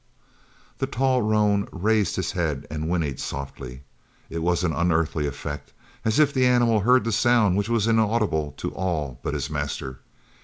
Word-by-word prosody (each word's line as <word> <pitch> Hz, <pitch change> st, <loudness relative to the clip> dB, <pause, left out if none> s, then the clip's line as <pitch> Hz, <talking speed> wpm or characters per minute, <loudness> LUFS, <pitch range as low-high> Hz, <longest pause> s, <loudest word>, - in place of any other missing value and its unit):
The 135 Hz, -, 0 dB
tall 130 Hz, -1 st, +1 dB
roan 105 Hz, -2 st, +2 dB
raised 105 Hz, 0 st, +1 dB
his 95 Hz, -3 st, -2 dB
head 75 Hz, -6 st, -2 dB
and 80 Hz, +1 st, -3 dB
whinnied 80 Hz, -7 st, -1 dB
softly. 70 Hz, -1 st, -6 dB, 0.5 s
It 85 Hz, -, -3 dB
was 85 Hz, +1 st, +1 dB
an 85 Hz, -3 st, +1 dB
unearthly 85 Hz, -3 st, +1 dB
effect 70 Hz, +1 st, -6 dB, 0.3 s
as 110 Hz, +3 st, +1 dB
if 150 Hz, -2 st, +4 dB
the 130 Hz, -1 st, +3 dB
animal 120 Hz, -3 st, +3 dB
heard 125 Hz, +3 st, +4 dB
the 115 Hz, -, -1 dB
sound 110 Hz, -3 st, +3 dB
which 100 Hz, +3 st, -1 dB
was 115 Hz, -3 st, +2 dB
inaudible 110 Hz, -, +1 dB
to -, -, -4 dB
all 75 Hz, -9 st, -3 dB
but -, -, -3 dB
his -, -, -3 dB
master. 70 Hz, -3 st, -4 dB
95 Hz, 165 wpm, -24 LUFS, 75-115 Hz, 0.5 s, if